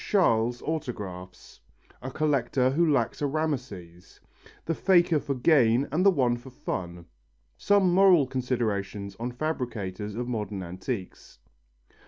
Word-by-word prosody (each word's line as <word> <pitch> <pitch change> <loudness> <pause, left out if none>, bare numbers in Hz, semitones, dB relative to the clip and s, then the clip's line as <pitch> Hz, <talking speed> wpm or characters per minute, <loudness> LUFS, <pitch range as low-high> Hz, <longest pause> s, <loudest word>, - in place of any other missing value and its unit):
Chasles' 120 - +1
autographs 100 - -6 0.4
A 130 - -5
collector 135 -3 +1
who 160 +3 +2
lacks 120 -3 0
a 145 - +1
Rameses 125 - -5 0.5
The 165 - 0
faker 175 -2 +3
for 140 -1 -3
gain 125 -2 +3
and 165 +5 +1
the 200 - +7
one 130 -9 +1
for 120 +2 -12
fun 85 -8 -6 0.5
Some 195 - +3
moral 185 -5 +6
considerations 105 -6 -3
on 120 +2 -3
fabricators 115 - -4
of 120 +1 -3
modern 105 -5 -4
antiques. 95 +3 -6
125 Hz, 125 wpm, -27 LUFS, 105-155 Hz, 0.5 s, the